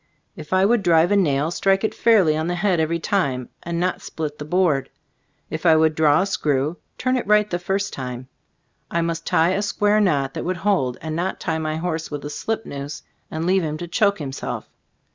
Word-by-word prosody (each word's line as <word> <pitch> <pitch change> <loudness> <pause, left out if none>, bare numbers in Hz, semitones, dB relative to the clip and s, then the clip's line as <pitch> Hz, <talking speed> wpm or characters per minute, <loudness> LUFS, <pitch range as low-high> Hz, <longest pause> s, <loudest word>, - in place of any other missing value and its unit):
If 150 - -10
I 185 +1 +4
would 230 +1 +3
drive 170 -1 +4
a - - +4
nail, 155 -5 +2
strike 195 +2 +1
it 220 - 0
fairly 200 -10 +4
on 160 +1 -1
the 175 - -1
head 180 -1 +1
every 160 +1 +1
time, 140 -10 -1
and 170 0 -3
not 180 +1 -1
split 150 -2 -5
the 150 - -5
board. 160 -4 +1 0.6
If 155 - -4
I 165 -3 +6
would 160 0 +3
draw 155 +1 +4
a - - -1
screw, 150 -4 0 0.2
turn 255 0 +1
it 240 - -3
right 210 0 +4
the 175 -3 -2
first 195 +2 -2
time. 125 -1 -6 0.6
I 170 - 0
must 165 0 -3
tie 165 +2 +3
a 195 +2 0
square 210 +1 +2
knot 140 -8 +1
that - - -4
would 185 +1 -2
hold, 170 -10 0
and 160 -1 -3
not 180 +3 -2
tie 160 -1 -2
my 155 -1 -2
horse 160 -1 -3
with 145 -1 -6
a 145 - -5
slip 225 +5 -3
noose 140 0 -6 0.3
and 160 +1 -3
leave 190 +1 +3
him 155 -1 -2
to 175 - -6
choke 200 +3 +2
himself. 135 -4 -5
165 Hz, 220 wpm, -22 LUFS, 155-195 Hz, 0.6 s, I